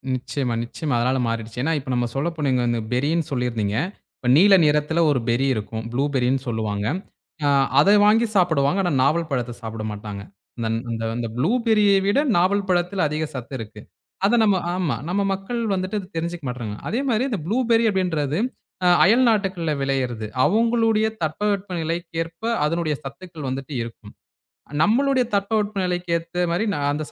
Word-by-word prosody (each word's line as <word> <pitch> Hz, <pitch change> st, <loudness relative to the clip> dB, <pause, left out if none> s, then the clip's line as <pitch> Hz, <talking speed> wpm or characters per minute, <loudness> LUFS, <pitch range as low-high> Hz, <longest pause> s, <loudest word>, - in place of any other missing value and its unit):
நிச்சயமா, 125 Hz, -1 st, -3 dB
நிச்சயமா 140 Hz, +3 st, -3 dB
அதனால 130 Hz, +2 st, +1 dB
மாறிடுச்சு. 115 Hz, +1 st, -4 dB
ஏன்னா 165 Hz, +3 st, +1 dB
இப்ப 135 Hz, -1 st, -10 dB
நம்ம 120 Hz, -1 st, +1 dB
சொல்லப்போனா 150 Hz, -1 st, -1 dB
இங்க 125 Hz, -, +1 dB
அந்த 120 Hz, -1 st, 0 dB
பெர்ரி 135 Hz, +4 st, +1 dB
ன்னு 165 Hz, -3 st, -1 dB
சொல்லிருந்தீங்க. 115 Hz, -5 st, -1 dB, 0.6 s
நீல 200 Hz, +3 st, +6 dB
நிறத்துல 150 Hz, +2 st, +2 dB
ஒரு 135 Hz, -, +1 dB
பெர்ரி 125 Hz, +4 st, +2 dB
இருக்கும் 110 Hz, +1 st, -4 dB
புளூபெர்ரின்னு 135 Hz, -1 st, +1 dB
சொல்லுவாங்க. 105 Hz, -3 st, -2 dB, 0.6 s
அ -, -, +3 dB, 0.3 s
அத 200 Hz, -, +5 dB, 0.2 s
வாங்கி 225 Hz, +3 st, +5 dB
சாப்பிடுவாங்க. 170 Hz, -2 st, +2 dB
ஆனா 175 Hz, -, 0 dB
நாவல் 160 Hz, +3 st, +1 dB
பழத்த 120 Hz, -2 st, -2 dB
சாப்பிட 110 Hz, -1 st, -5 dB
மாட்டாங்க. 105 Hz, -1 st, -7 dB, 0.4 s
அந்த 115 Hz, -1 st, -2 dB, 0.2 s
அந்த 115 Hz, 0 st, -3 dB
அந்த 120 Hz, -1 st, -2 dB
புளூபெர்ரியை 210 Hz, -, +3 dB
விட 205 Hz, +7 st, +3 dB, 0.2 s
நாவல் 195 Hz, +2 st, +2 dB
பழத்துல 180 Hz, -1 st, +1 dB
அதிக 155 Hz, +1 st, -2 dB
சத்து 130 Hz, +2 st, -7 dB
இருக்கு. 105 Hz, -1 st, -9 dB, 0.4 s
அத 215 Hz, +4 st, +4 dB
நம்ம 205 Hz, -3 st, +3 dB, 0.2 s
ஆமா 175 Hz, -9 st, 0 dB
நம்ம 200 Hz, +3 st, +1 dB
மக்கள் 195 Hz, +5 st, -4 dB, 0.2 s
வந்துட்டு 185 Hz, +3 st, -2 dB
அதத் 190 Hz, -2 st, -12 dB
தெரிஞ்சுக்க 170 Hz, -2 st, -4 dB
மாட்றாங்க. 115 Hz, -4 st, -5 dB
அதே 230 Hz, +6 st, -1 dB
மாதிரி 240 Hz, +4 st, +1 dB
இந்த 205 Hz, -, -1 dB
புளூபெர்ரி 230 Hz, +1 st, +2 dB
அப்டின்றது 165 Hz, -5 st, 0 dB, 0.5 s
அ -, -, +5 dB, 0.2 s
அயல்நாட்டுகளில 200 Hz, -7 st, +2 dB
விளயிறது. 125 Hz, -5 st, -1 dB, 0.2 s
அவங்களுடைய 225 Hz, +3 st, +2 dB, 0.2 s
தட்பவெப்பநிலைக்கு 175 Hz, -1 st, -2 dB
ஏற்ப 165 Hz, +5 st, -15 dB, 0.2 s
அதனுடைய 155 Hz, -1 st, 0 dB
சத்துக்கள் 160 Hz, 0 st, -8 dB
வந்துட்டு 135 Hz, +2 st, -5 dB
இருக்கும். 110 Hz, -2 st, -11 dB, 0.7 s
நம்மளுடைய 260 Hz, -, +3 dB
தட்பவெப்பநிலைக்கு 200 Hz, -4 st, -1 dB
ஏத்த 170 Hz, +2 st, -3 dB
மாதிரி 190 Hz, +6 st, 0 dB
நா -, -, -2 dB
அந்தச் 150 Hz, +1 st, -4 dB
165 Hz, 155 wpm, -22 LUFS, 125-195 Hz, 0.7 s, நீல